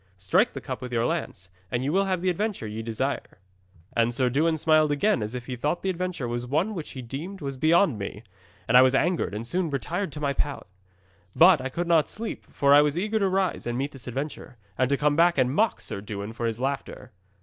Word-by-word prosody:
Strike 95 0 +2
the - - -6
cup - - -6
with 125 -1 -6
your 115 -1 +1
lance, 135 - -3 0.2
and 125 +3 -1
you 145 +3 -1
will 195 +1 +3
have 185 -2 -1
the 185 - +3
adventure 205 - -2
ye 110 +1 -5
desire." 115 +5 -3 0.6
'And 115 0 +2
Sir 125 -1 +2
Dewin 160 +4 +2
smiled 155 -1 +3
again 145 - +2
as 105 +3 -4
if 125 -1 -5
he 125 - -4
thought 145 +8 -2
the 190 - +1
adventure 180 -7 -3
was 120 +1 -3
one 160 - 0
which 165 -6 -6
he 130 - -7
deemed 155 +11 -6
was 140 -2 -4
beyond 155 - +3
me, 100 +2 -6 0.4
and 115 - +2
I 125 - +10
was 130 0 +4
angered 170 - +1
and 110 +2 -4
soon 175 +6 -1
retired 165 +6 -3
to 150 - -6
my 140 -2 0
pallet. 145 0 -2 0.7
But 170 -4 +7
I 135 - -3
could 170 +6 -3
not 165 -3 +3
sleep, 225 +1 -6
for 140 0 +3
I 145 - +8
was 150 +1 0
eager 215 +4 0
to 195 -2 +2
rise 185 -7 -1
and 120 0 -2
meet 140 +3 -2
this 135 -2 -11
adventure, 130 0 -5 0.2
and 130 0 +1
to 140 - +2
come 145 0 +2
back 170 +1 +4
and 130 -1 +2
mock 220 +8 +2
Sir 100 - -5
Dewin 105 +1 -6
for 115 0 -2
his 115 0 -3
laughter. 135 -1 -4
140 Hz, 240 wpm, -26 LUFS, 125-170 Hz, 0.7 s, I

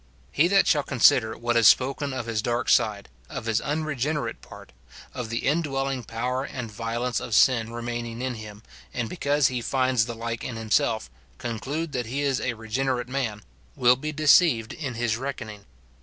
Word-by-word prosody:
He 160 +4 +3
that 195 +1 +4
shall 150 - +3
consider 120 -4 +3
what 120 0 -1
is 115 -2 +6
spoken 135 +2 +3
of 130 -3 -4
his 115 -2 -1
dark 120 +1 -1
side, 105 -4 +2 0.2
of 135 -6 -6
his 110 -1 +1
unregenerate 150 -1 -2
part, - - -13 0.4
of 125 -3 -5
the 115 +1 -3
indwelling 135 -4 0
power 125 +4 -2
and 125 -5 -6
violence 120 +3 -2
of 110 - -3
sin 115 -2 +4
remaining 120 0 -5
in 130 0 -2
him, 110 -1 -10 0.3
and 120 -2 -1
because 145 -1 +1
he 125 -2 -3
finds 130 -2 +1
the 120 - -5
like 115 0 -4
in 120 - -5
himself, 110 - 0 0.3
conclude 140 +8 -4
that 125 -4 -3
he 135 +5 -2
is 135 -2 0
a 125 - -1
regenerate 125 +3 -2
man, 120 -6 -3 0.3
will 125 -2 +5
be 155 +4 -4
deceived 150 -6 +4
in 135 -6 -5
his 115 -1 0
reckoning. 115 -6 -6
125 Hz, 175 wpm, -25 LUFS, 115-135 Hz, 0.4 s, is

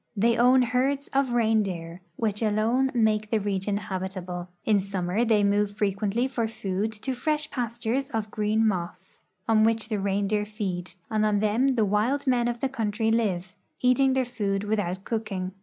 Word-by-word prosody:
They 230 +3 +3
own 250 +2 +5
herds 265 +3 0
of 270 -2 +1
reindeer, 195 -7 0
which 210 0 -1
alone 225 +5 +2
make 215 -2 +2
the 225 - +2
region 200 0 -1
habitable. 185 -3 -5 0.2
In 210 -2 +4
summer 190 +2 -1
they 220 -3 +3
move 205 0 +1
frequently 210 +4 0
for 240 -4 -1
food 210 -1 -2
to 265 - -1
fresh 305 +3 -1
pastures 240 +2 -2
of 215 -3 -3
green 215 +1 +1
moss, 175 -4 -4 0.2
on 220 -1 +4
which 225 0 +1
the 215 -3 -1
reindeer 200 +1 0
feed, 190 -5 -4 0.2
and 215 -1 +1
on 210 -1 +2
them 235 +6 +2
the 220 -3 +3
wild 220 +8 +1
men 245 -3 +2
of 240 -1 -3
the 270 - +2
country 225 -3 -1
live, 190 -5 0 0.2
eating 260 +1 +3
their 260 -1 +1
food 205 -5 -2
without 200 -3 -2
cooking. 205 -5 -3
215 Hz, 170 wpm, -26 LUFS, 200-240 Hz, 0.2 s, own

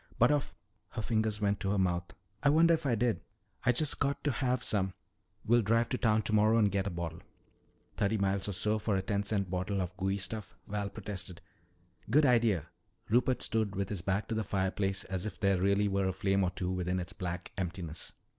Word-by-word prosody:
"But - - +5
of 145 -2 0 0.2
" 110 - -45
Her 110 - -2
fingers 110 -2 0
went 100 -1 +1
to 95 - -2
her 100 - +1
mouth. 90 -2 0 0.3
"I 145 - +4
wonder 165 +3 +5
if 160 -3 0
I 120 - +3
did? 120 0 +1 0.4
I've 125 -1 +3
just 150 +2 +2
got 140 0 0
to 145 - +2
have 125 -1 0
some. 95 -3 0 0.5
We'll 120 +2 +4
drive 115 +2 +2
to 125 - 0
town 110 -2 +3
tomorrow 110 +2 +3
and 105 -3 +4
get 100 0 0
a - - 0
bottle." 85 -1 -5 0.8
"Thirty 105 +2 +1
miles 100 0 0
or - - -2
so 105 +4 +1
for 105 -1 0
a 95 - 0
ten 100 0 0
cent 100 -3 -1
bottle 95 +2 -1
of 90 -1 -3
gooey 95 +1 0
stuff," 105 +1 -4
Val 100 -1 -2
protested. 95 -5 -6 0.7
"Good 150 +1 +5
idea." 115 - +3 0.4
Rupert 125 +3 +2
stood 110 -2 0
with 100 0 -2
his 100 -5 -3
back 100 +3 -1
to - - -1
the 110 0 0
fireplace 95 0 -1
as 95 +2 -3
if - - -8
there 100 -3 +2
really 100 +1 +3
were 100 -1 +1
a 95 - 0
flame 95 +1 +1
or 90 - +2
two 90 0 -3
within 90 0 -1
its 90 +1 -5
black 90 0 -5
emptiness. 85 -3 -5
100 Hz, 215 wpm, -32 LUFS, 95-110 Hz, 0.8 s, But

